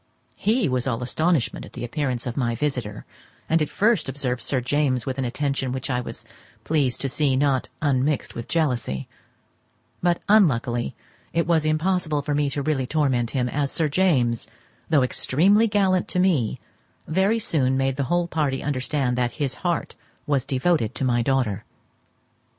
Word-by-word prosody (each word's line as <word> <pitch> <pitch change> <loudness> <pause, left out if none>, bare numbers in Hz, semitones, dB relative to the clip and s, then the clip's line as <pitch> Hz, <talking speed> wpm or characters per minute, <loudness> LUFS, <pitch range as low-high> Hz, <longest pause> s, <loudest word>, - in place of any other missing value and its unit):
He 215 -2 +1
was 125 -1 -1
all 125 -1 -1
astonishment 155 +2 0
at - - -12
the - - -6
appearance 125 -2 -2
of 120 -1 -3
my 120 -4 0
visitor, 125 -7 -3 0.4
and 165 0 +2
at 150 - 0
first 210 - +2
observed 130 -2 -2
Sir 135 - 0
James 130 -1 0
with 130 0 -3
an 130 - 0
attention 135 +1 -1
which 130 +1 -3
I 125 -1 0
was - - -8 0.4
pleased 145 -6 0
to 140 - 0
see 135 0 +1
not 135 -1 +1
unmixed 140 0 +1
with 115 - -6
jealousy; 125 - -1 0.9
but 175 -1 +2
unluckily 125 - +3 0.4
it 170 0 +1
was 165 -3 +2
impossible 155 -1 0
for 145 - -1
me 145 0 +1
really 140 -2 -1
to - - -12
torment 130 -6 +1
him, 125 -2 -1
as 140 +2 -1
Sir 160 -2 +1
James, 140 -9 +2 0.4
though 150 -5 +4
extremely 190 - +3
gallant 195 -3 +2
to 180 - -1
me, 165 - +2 0.5
very 190 +7 +2
soon 145 - +1
made 135 0 +1
the 140 - -1
whole 175 +4 +1
party 150 -5 -1
understand 135 -2 -1
that 120 -1 0
his 140 -4 -2
heart 175 -2 -1 0.3
was 140 -4 0
devoted 135 -3 0
to 135 - -1
my 120 -1 +2
daughter. 115 -5 0
140 Hz, 165 wpm, -24 LUFS, 125-160 Hz, 0.9 s, though